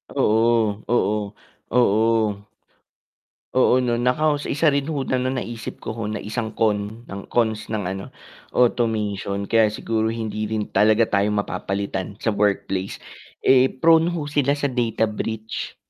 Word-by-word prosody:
Oo, 110 -1 +2
oo. 105 -3 +2 0.5
Oo. 110 -3 +2 1.1
Oo 130 0 +4
'no 120 -2 +1
nako, 125 +6 +2
sa - - -3
isa 150 +3 +2
rin 140 +2 +1
ho 140 -3 -2
na 130 - +1
na 130 - 0
naisip 115 -1 -7
ko 110 - -6
ho 115 - -4
na 105 - -3
isang 110 +1 -4
con 110 +1 -1
ng 100 0 -6
cons 110 -3 0
ng 110 - -1
ano, 95 +1 -5 0.4
automation 105 -5 0
kaya 110 -2 +3
siguro 110 +1 -1
hindi 110 -1 -4
rin 110 -1 -1
talaga 110 +2 +3
tayo 100 +1 +1
mapapalitan 100 -1 -3
sa 110 -3 -1
workplace, 100 -2 -1 0.4
eh, 130 0 +4
prone 165 +5 +4
ho 155 -4 -3
sila 145 -2 +1
sa 145 0 0
data 120 -3 0
breach. 110 +1 -5
110 Hz, 145 wpm, -22 LUFS, 105-125 Hz, 1.1 s, Oo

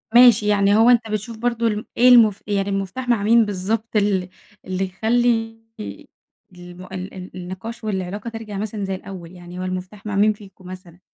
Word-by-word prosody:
ماشي، 240 -4 +7
يعني 200 -1 +3
هو 225 +3 +6
أنت 235 -2 +4
بتشوف 220 +2 -4
برضه 235 0 0
ال 210 0 -2
إيه 250 +2 +6
المف 220 -5 +6
يعني 200 -1 0
المفتاح 195 +6 -3
مع 220 -4 +2
مين 230 +1 +5
بالضبط 210 +3 -3
ال 195 -3 +1 0.4
اللي 185 +1 -1
يخلّي 225 +3 0 1.0
الم 180 0 -11
ال 190 +1 -6
ال 185 -1 -9
النِقاش 190 +6 -7
والعلاقة 205 +1 -3
ترجَع 225 -3 -7
مثلًا 210 -1 -3
زي 190 0 -2
الأول، 185 -3 -9
يعني 180 0 -10
هو - - -3
المفتاح 185 +3 -6
مع 205 -1 -3
مين 210 +2 +4
فيكم 195 -3 -16
مثلًا؟ 185 -2 -11
205 Hz, 180 wpm, -21 LUFS, 185-225 Hz, 1.0 s, ماشي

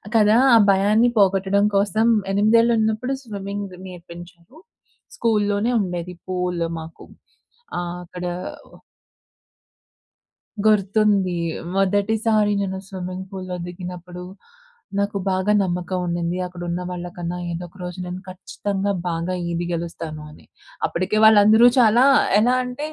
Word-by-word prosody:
కదా! 215 0 +5 0.2
ఆ - - +8
భయాన్ని 210 +5 +4
పోగొట్టడం 195 +1 +3
కోసం 210 +3 +2 0.2
ఎనిమిదేళ్ళున్నప్పుడు 220 +3 +2
స్విమ్మింగ్ 200 -3 -6
నేర్పించారు. 175 - -13 0.6
స్కూల్‌లోనే 210 0 +1
ఉండేది 180 -1 -4
పూల్ 180 -2 -2 0.2
మాకు. 160 +1 -11 0.7
ఆ! - - 0 0.2
అక్కడ 180 +1 -8 2.4
గుర్తుంది. 200 -2 +2 0.4
మొదటిసారి 210 +2 +2
నేను 190 -1 -3
స్విమ్మింగ్ 185 0 -6
పూల్‌లో 185 -2 -6
దిగినప్పుడు 180 0 -8 0.8
నాకు 200 0 -1
బాగా 190 +2 +1
నమ్మకం 180 0 -2
ఉండింది, 170 0 -2
"అక్కడున్న 175 0 -5
వాళ్ళకన్నా 175 0 -5 0.2
ఏదో 170 +1 -5
ఒక 180 - -22
రోజు 180 +1 -7
నేను 180 +1 -6
ఖచ్చితంగా 195 +2 -3 0.2
బాగా 170 +2 -2 0.2
ఈది 170 0 -2
గెలుస్తాను" 165 -2 -5
అని. 150 - -17 0.4
అప్పటికే 185 +5 -1
వాళ్ళందరూ 220 +2 +7
చాలా 240 +1 +5 0.4
ఎలా 245 +3 +3
అంటే 250 +4 -5
190 Hz, 105 wpm, -22 LUFS, 180-210 Hz, 2.4 s, ఆ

